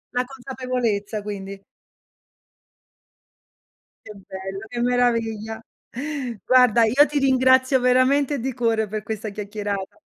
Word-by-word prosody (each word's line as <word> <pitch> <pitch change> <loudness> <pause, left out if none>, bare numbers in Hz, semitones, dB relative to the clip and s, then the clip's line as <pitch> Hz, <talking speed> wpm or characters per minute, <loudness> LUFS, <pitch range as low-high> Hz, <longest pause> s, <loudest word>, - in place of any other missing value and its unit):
La 250 - +1
consapevolezza 250 -5 -3
quindi. 200 -1 -7 2.4
Che - - -9
bello, 195 0 -8
che 240 +1 -4
meraviglia. 225 -3 0 0.8
Guarda, 250 -3 +5
io 260 +7 +5
ti 295 - -1
ringrazio 260 0 +4
veramente 260 +3 +3
di 260 +2 -3
cuore 225 -3 0
per 215 +1 -4
questa 215 0 -5
chiacchierata. 205 +5 -5
230 Hz, 100 wpm, -23 LUFS, 210-255 Hz, 2.4 s, Guarda